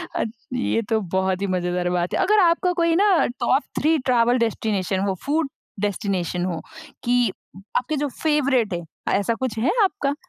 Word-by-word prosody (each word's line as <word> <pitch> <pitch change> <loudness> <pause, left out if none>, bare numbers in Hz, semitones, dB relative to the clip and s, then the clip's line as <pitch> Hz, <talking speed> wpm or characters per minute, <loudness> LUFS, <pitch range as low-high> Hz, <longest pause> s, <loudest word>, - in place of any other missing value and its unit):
अ, - - +1 0.3
ये 245 -2 0
तो 220 -1 +2 0.2
बहुत 190 0 +1
ही 200 - 0
मज़ेदार 180 -1 -1
बात 175 0 -1
है। - - 0
अगर 405 +3 +4
आपका 360 0 +3
कोई 335 -1 +3
ना 390 -1 +4
टॉप 270 +3 +2 0.2
3 315 +2 +3
ट्रैवल 245 -1 +3
डेस्टिनेशन 205 -4 0
हो, 195 -1 0
फूड 300 0 +1 0.3
डेस्टिनेशन 190 -3 -1
हो, 175 -3 -3 0.4
कि 245 -4 +2 0.5
आपके 260 +5 -1
जो 290 +1 0 0.2
फेवरेट 275 - +2
है 175 -1 -3 0.4
ऐसा 205 +3 0
कुछ 250 -4 -2
है 265 +10 +2
आपका? 285 -6 0
235 Hz, 170 wpm, -23 LUFS, 190-295 Hz, 0.5 s, अगर